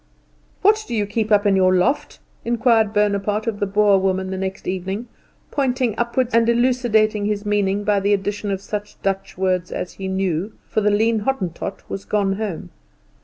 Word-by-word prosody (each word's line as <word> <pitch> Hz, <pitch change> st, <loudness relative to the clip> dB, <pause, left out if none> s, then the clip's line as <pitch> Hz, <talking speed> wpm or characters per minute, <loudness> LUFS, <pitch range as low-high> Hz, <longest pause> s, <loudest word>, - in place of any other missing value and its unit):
"What 430 Hz, +2 st, +4 dB
do 235 Hz, -, -3 dB
you 210 Hz, -2 st, +1 dB
keep 215 Hz, +1 st, -2 dB
up 205 Hz, 0 st, +4 dB
in 200 Hz, -1 st, +4 dB
your 185 Hz, -1 st, +4 dB
loft?" 240 Hz, +11 st, 0 dB, 0.3 s
inquired 230 Hz, -2 st, +2 dB
Bonaparte 210 Hz, 0 st, 0 dB
of 220 Hz, -3 st, -2 dB
the 205 Hz, -, 0 dB
Boer 205 Hz, 0 st, +4 dB
woman 190 Hz, 0 st, -1 dB
the -, -, -2 dB
next 190 Hz, 0 st, -4 dB
evening, 190 Hz, +5 st, -3 dB, 0.4 s
pointing 255 Hz, -4 st, 0 dB
upwards 240 Hz, +2 st, -1 dB
and 230 Hz, 0 st, +4 dB
elucidating 235 Hz, -4 st, +2 dB
his 210 Hz, 0 st, -2 dB
meaning 205 Hz, -1 st, +1 dB
by 205 Hz, -1 st, +2 dB
the 200 Hz, +1 st, 0 dB
addition 205 Hz, +1 st, -3 dB
of 195 Hz, -1 st, -2 dB
such 210 Hz, 0 st, -6 dB
Dutch 195 Hz, -1 st, -2 dB
words 185 Hz, -1 st, 0 dB
as 180 Hz, -, -4 dB
he 195 Hz, -, -6 dB
knew, 190 Hz, +1 st, -1 dB
for 215 Hz, -, 0 dB
the 210 Hz, -, +3 dB
lean 220 Hz, +2 st, +2 dB
Hottentot 195 Hz, -6 st, -3 dB
was 195 Hz, -, -5 dB
gone 195 Hz, -2 st, 0 dB
home. 200 Hz, -, -5 dB
205 Hz, 180 wpm, -21 LUFS, 195-225 Hz, 0.4 s, What